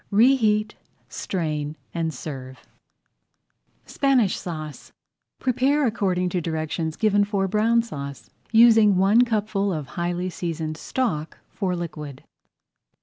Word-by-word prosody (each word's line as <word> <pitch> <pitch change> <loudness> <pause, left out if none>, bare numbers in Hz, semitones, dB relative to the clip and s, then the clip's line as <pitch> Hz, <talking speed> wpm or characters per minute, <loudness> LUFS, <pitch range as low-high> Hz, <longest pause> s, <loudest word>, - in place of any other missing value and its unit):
Reheat, 215 -2 +3 0.4
strain, 155 -4 -3 0.2
and 165 -1 -1
serve. 130 -2 -8 1.2
SPANISH 265 -8 +2
SAUCE 155 -5 -7 0.5
Prepare 270 +3 +1
according 185 -6 0
to 180 0 -1
directions 160 0 -3
given 205 0 +3
for 200 -1 0
Brown 225 +4 +2
Sauce, 140 - -8 0.2
using 225 -3 +6
one 200 +5 +5
cupful 210 -3 0
of 150 -6 -4
highly 175 +1 -2
seasoned 160 -3 -4
stock 165 -13 -2
for 185 -3 -2
liquid. 150 -5 -7
185 Hz, 105 wpm, -24 LUFS, 160-220 Hz, 1.2 s, using